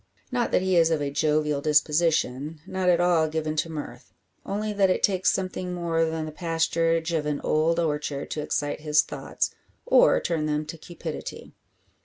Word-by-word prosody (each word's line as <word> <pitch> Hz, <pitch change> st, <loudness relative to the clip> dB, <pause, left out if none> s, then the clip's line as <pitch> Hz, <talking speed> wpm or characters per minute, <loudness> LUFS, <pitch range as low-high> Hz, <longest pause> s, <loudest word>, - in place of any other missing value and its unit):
Not 245 Hz, -2 st, 0 dB
that -, -, +2 dB
he 190 Hz, -1 st, +1 dB
is 165 Hz, -1 st, +5 dB
of 160 Hz, -2 st, +1 dB
a 145 Hz, -1 st, -2 dB
jovial 150 Hz, 0 st, +1 dB
disposition, 150 Hz, -1 st, +1 dB
not 185 Hz, -1 st, -1 dB
at 175 Hz, -1 st, +4 dB
all 175 Hz, -3 st, +3 dB
given 155 Hz, 0 st, -2 dB
to 165 Hz, -, 0 dB
mirth; 135 Hz, -5 st, -8 dB, 0.3 s
only 210 Hz, +1 st, -3 dB
that 200 Hz, -2 st, +3 dB
it 185 Hz, -, 0 dB
takes 190 Hz, -2 st, +3 dB
something 185 Hz, -1 st, -3 dB
more 165 Hz, -2 st, 0 dB
than 160 Hz, -1 st, -3 dB
the 155 Hz, -, -6 dB
pasturage 165 Hz, 0 st, 0 dB
of 150 Hz, -2 st, 0 dB
an 150 Hz, -1 st, -1 dB
old 165 Hz, +2 st, +1 dB
orchard 150 Hz, -3 st, -2 dB
to 155 Hz, -, -2 dB
excite 145 Hz, 0 st, -2 dB
his 150 Hz, -1 st, +3 dB
thoughts, -, -, -3 dB, 0.3 s
or -, -, +5 dB
turn 160 Hz, -3 st, -1 dB
them 150 Hz, 0 st, -1 dB
to 155 Hz, +2 st, -7 dB
cupidity. 165 Hz, -1 st, -7 dB
160 Hz, 180 wpm, -26 LUFS, 150-175 Hz, 0.3 s, is